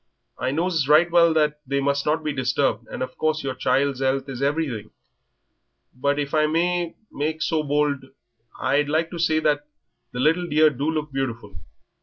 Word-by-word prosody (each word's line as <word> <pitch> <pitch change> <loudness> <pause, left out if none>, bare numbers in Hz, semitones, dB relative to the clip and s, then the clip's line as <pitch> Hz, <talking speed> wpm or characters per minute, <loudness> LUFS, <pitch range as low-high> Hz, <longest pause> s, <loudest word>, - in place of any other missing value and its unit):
I 130 - -1
knows 160 0 0
right 160 +4 +5
well 170 -1 +5
that 150 -1 +2
they 140 +1 0
must 140 +1 0
not 155 +1 +1
be 150 -1 -1
disturbed, 125 -3 0
and - - -4
of 130 - -7
course 155 0 0
your 135 -1 -2
child's 135 +1 0
'ealth 135 +1 0
is 130 -1 -6
everything; 140 -7 -1 1.0
but 140 +3 0
if 145 0 -3
I 155 -1 +3
may 170 +2 0 0.2
make 155 +2 -2
so 160 -1 +1
bold 145 -2 0 0.5
I'd 145 +1 +1
like 160 +2 0
to 175 - -6
say 160 -1 +2
that 150 -1 0 0.4
the 125 - -6
little 165 +6 +2
dear 155 0 +4
do 140 +3 -2
look 155 -2 -2
beautiful. 120 -7 -4
145 Hz, 180 wpm, -23 LUFS, 135-155 Hz, 1.0 s, right